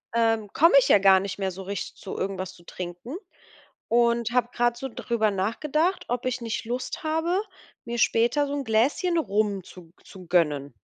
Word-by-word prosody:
ähm, 225 -3 +1
komme 335 +3 +5
ich - - +1
ja 205 - +6
gar 190 -1 +6
nicht 195 0 -5
mehr 190 -1 -1
so 190 +2 -8
richtig 200 +1 -5
zu 195 - -8
irgendwas 190 -1 -3
zu 175 - -18
trinken 180 - -7 0.7
und 235 -1 +2
habe 245 -1 +1
grade 240 0 +1
so 270 +1 -5
drüber 225 -2 0
nachgedacht, 300 - -1
ob 245 +1 -2
ich 255 -1 -2
nicht 225 0 -3
Lust 250 +6 -4
habe, 325 +5 0 0.4
mir 235 0 -4
später 240 +7 +2
so 280 - -4
'n 285 -1 -2
Gläschen 265 +10 +1
Rum 205 - 0
zu 180 0 -13
g - - -28
zu 185 -2 -13
gönnen. 150 -6 +1
230 Hz, 190 wpm, -25 LUFS, 190-255 Hz, 0.7 s, ja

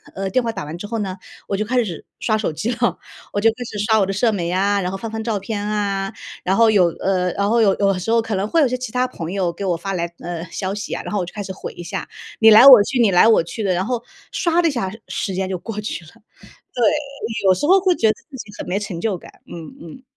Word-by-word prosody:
呃， 195 0 -3
电 255 +7 +2
话 230 - -1
打 195 -4 -6
完 150 +2 -6
之 180 - -7
后 225 +1 -3
呢， 190 -3 -3 0.3
我 200 - -1
就 205 - -1
开 245 +2 +1
始 175 -8 -6 0.2
刷 215 -2 +1
手 215 -6 -1
机 165 +10 -2
了， 240 0 0 0.4
我 205 - 0
就 225 - +5
开 - - -15
始 215 - -7
刷 220 -1 +4
我 195 - +3
的 195 - -2
社 225 +4 +2
媒 175 -5 -2
啊， 200 +2 +2
然 180 0 -2
后 195 - -4
翻 225 +3 -6
翻 220 0 -4
照 220 -2 -1
片 205 +1 -4
啊。 200 -2 -1 0.3
然 190 - +1
后 225 +1 +5
有 190 -5 +5
呃， 185 -1 +1
然 200 - 0
后 230 +1 +3
有 200 -3 +4
有 195 -2 +2
时 185 - -5
候 230 0 +4
可 225 -1 -4
能 195 +2 -1
会 330 - +2
有 285 - +4
一 - - -4
些 255 - -1
其 250 -3 -6
他 250 +2 +1
朋 165 -7 -6
友 185 -3 0
给 200 - -7
我 180 -2 +1
发 195 +3 -4
来， 170 -2 -1
呃， 170 -1 -5
消 190 +2 -3
息 205 +1 -5
啊， - - -5
然 - - -6
后 205 - +1
我 180 - -1
就 175 - -10
开 205 - -5
始 190 - -6
回 - - -7
一 175 - -9
下， 170 - -5 0.3
你 220 - +7
来 220 +4 +9
我 260 -6 +11
去 250 +4 -2
你 225 -4 +4
来 180 +4 +6
我 225 -6 +5
去 170 +7 -6
的。 190 -2 +1
然 180 +2 -1
后 240 0 -2 0.3
刷 340 -1 +1
的 340 - +2
一 - - -1
下 235 -8 -2 0.2
时 195 - -3
间 190 0 -1
就 185 -2 -3
过 210 +2 -6
去 210 -4 -5
了。 155 - -15 0.6
对， 245 - -1 0.6
有 190 - +6
时 185 - -2
候 380 +5 +6
会 370 -2 +3
觉 225 - +2
得 - - +3 0.2
自 275 - -9
己 220 -4 -9
很 - - -6
没 185 - 0
成 190 -5 -5
就 205 -3 -1
感， - - -14 0.2
嗯 165 -3 -9
嗯。 170 +10 -11
205 Hz, 320 characters per minute, -20 LUFS, 185-225 Hz, 0.6 s, 我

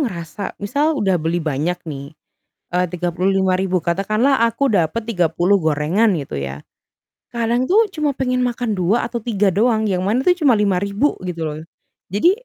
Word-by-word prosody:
ngerasa 185 - -4
misal 290 +9 +1
udah 190 - +1
beli 165 +2 -1
banyak, 155 +3 -1
nih, 140 -1 -7 0.6
eee, 180 +1 +2
Rp35.000. 185 +1 0
Katakanlah 215 +9 +2
aku 230 +3 0
dapat 180 +4 +1
30 180 -1 +2
gorengan, 160 +8 +2
gitu, 140 - -5
ya. 70 +1 -6 0.7
Kadang 235 +1 0
tuh 440 +4 +5
cuma 305 -2 0
pengen 255 -1 0
makan 240 -3 -2
2 195 +8 +1
atau 240 0 -4
3 210 -4 +1
doang 220 0 +2
yang 185 -3 0
mana 235 +6 +1
tuh 360 - +6
cuma 285 -7 +4
Rp5.000, 200 +6 +1
gitu, 170 -2 -4
loh. 155 +1 -6 0.5
Jadi 215 - +4
200 Hz, 155 wpm, -19 LUFS, 175-235 Hz, 0.7 s, tuh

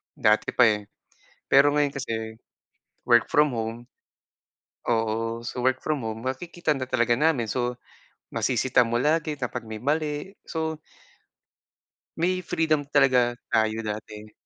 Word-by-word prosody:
dati 105 0 +2
pa, 125 - +6
eh. 105 -2 +2 0.6
Pero 145 +2 +6
ngayon 145 -1 +2
kasi 110 -5 -5 0.6
work 120 -2 +4
from 150 -1 +3
home 115 -1 -3 1.1
Oo. 115 0 -1
So, 125 +1 -3
work 130 0 +1
from 145 -7 -2
home 110 0 -5
makikita 160 +6 -3
na 135 -3 0
talaga 120 -2 +1
namin. 135 -8 +2
So, 125 +2 -1 0.6
masisita 125 -2 +2
mo 120 +1 0
lagi 155 +1 +1
kapag 125 -4 -5
may 110 0 -7
mali. 150 +4 -1 0.2
So 160 -1 -3 1.4
may 180 +2 +1
freedom 160 -5 0
talaga 130 -4 +3 0.2
tayo 110 0 +1
dati. 105 0 -6
125 Hz, 130 wpm, -25 LUFS, 115-150 Hz, 1.4 s, pa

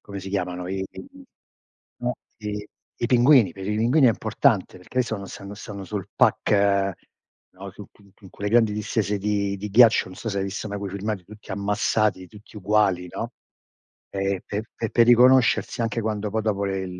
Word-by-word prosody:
come 100 -1 -8
si 95 0 -7
chiamano 90 -2 -3
i 95 +1 -3
i - - -10
i 280 -1 -15 0.7
no 125 0 -2 0.2
i 105 -1 -5 0.4
i 120 - +3
pinguini. 125 - +5
Per 95 +1 -8
i 105 - 0
pinguini 125 +6 +4
è - - +7
importante, 110 -3 +1
perché 90 - -18
hai - - +5
visto 115 -3 -1
quando 100 -2 -7
stanno 100 +1 -9
stanno 100 -1 -8
sul 100 -1 -5
pack, 100 -1 +2 0.6
no, 95 +1 -9
su 105 - -11 0.3
su 95 -3 -15
quelle 100 - -4
grandi 115 -2 +4
distese 105 0 -1
di 100 0 -1
di 105 +2 -5
ghiaccio, 115 +2 +6
non 95 - -11
so 110 - -4
se 100 - -2
hai 95 - -1
visto 100 +2 -5
mai 100 - -4
quei 100 -1 -5
filmati 100 0 -4
tutti 105 +3 -14
ammassati, 100 0 0
tutti 105 +2 -16
uguali, 100 -3 +1
no. - - -5 0.8
E 95 -1 -2
pe 105 +1 -3
pe 115 - -3
per 120 -1 +4
riconoscersi 125 0 +4
anche 115 0 -1
quando 105 -1 -2
poi 110 +1 -1
dopo 100 -2 -1
le 95 -1 -2
105 Hz, 195 wpm, -24 LUFS, 100-110 Hz, 0.8 s, è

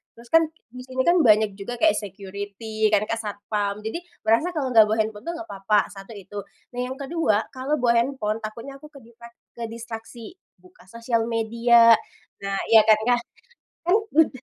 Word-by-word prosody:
Terus 235 0 -16
kan 325 -1 +5 0.2
di 250 - -10
sini 260 0 -2
kan 345 +1 +4
banyak 215 -6 +4
juga 245 +5 -5
kayak 320 0 +6
security 205 +2 -4
kan 210 0 +4
Kak 230 - -1
satpam, 205 -1 -3
jadi 225 +10 -4 0.2
merasa 235 +12 +2
kalau 270 -4 -1
nggak 220 -2 +7
bawa 215 - 0
handphone 215 0 -5
tuh 340 - -2
nggak 340 0 -8
apa-apa, 200 +2 +1
1 195 +2 -11
itu. 205 - -6 0.3
Nah 245 - -7
yang 260 - -5
ke-2, 270 -7 -1
kalau 265 +2 -4
bawa 235 -1 +3
handphone 230 -4 -1
takutnya 230 +5 -8
aku 300 - -12
keditrak 235 -2 -15 0.2
kedistraksi 230 +5 -8 0.2
buka 185 0 -20
sosial 230 +1 -1
media, 230 0 +5 0.4
nah 195 0 -3 0.2
iya 225 - +9
kan, 215 - +8
Kak? 245 +1 +2 0.7
Mhm, 400 -7 +3
230 Hz, 170 wpm, -24 LUFS, 210-255 Hz, 0.7 s, iya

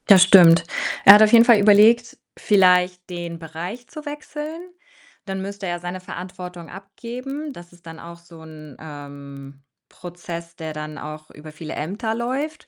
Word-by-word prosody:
Das 190 -3 +8
stimmt. 175 -3 +6 0.4
Er 200 - +11
hat 210 - +5
auf 215 -1 +5
jeden 235 0 +7
Fall 235 -3 +5
überlegt, 215 +3 +4 0.2
vielleicht 180 -2 +2
den 170 -1 -7
Bereich 170 +9 -8
zu 305 -1 -11
wechseln. 300 +2 -8 0.6
Dann 195 -1 -5
müsste 200 0 -7
er 175 0 -4
seine 175 +1 -7
Verantwortung 180 -2 -10
abgeben. 245 - -8
Das 175 -3 -14
ist 175 0 -23
dann 165 -1 -11
auch 170 0 -11
so 170 -1 -17
'n, 155 -3 -13
ähm, 140 -2 -12 0.3
Prozess, 170 -1 -10
der 160 -2 -7
dann 150 0 -8
auch 155 +1 -10
über 155 +1 -13
viele 155 +1 -9
Ämter 210 +8 -4
läuft. 265 +7 -5
180 Hz, 160 wpm, -21 LUFS, 160-215 Hz, 0.6 s, Er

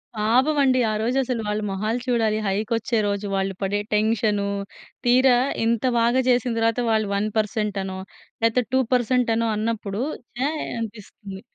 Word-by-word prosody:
పాపం 250 +8 +2
అండి. 260 -1 +3
ఆ - - -1
రోజు 240 +4 0
అసలు 250 -2 -2
వాళ్ళ 210 +1 -1
మొహాలు 215 +5 -1
చూడాలి. 225 -3 +1
హైక్ 205 +3 -2
వచ్చే 230 +1 -1
రోజు 200 0 -2
వాళ్ళు 195 0 -1
పడే 200 +1 0
టెన్షను. 210 -1 +1 0.6
తీరా 250 +1 +5 0.3
ఇంత 230 0 +1 0.2
బాగా 240 +3 +3
చేసిన 245 0 +2
తర్వాత 230 +1 +1
వాళ్ళు 215 -1 +1
1% 210 0 -1
అనో, 190 0 -5 0.4
లేకపోతే 230 +2 +2
2% 250 -1 +2
అనో 230 0 0
అన్నప్పుడు 215 -1 -2 0.4
ఛాయ్ 300 +4 -1 0.2
అనిపిస్తుంది. 205 -3 -8
225 Hz, 145 wpm, -23 LUFS, 210-245 Hz, 0.6 s, తీరా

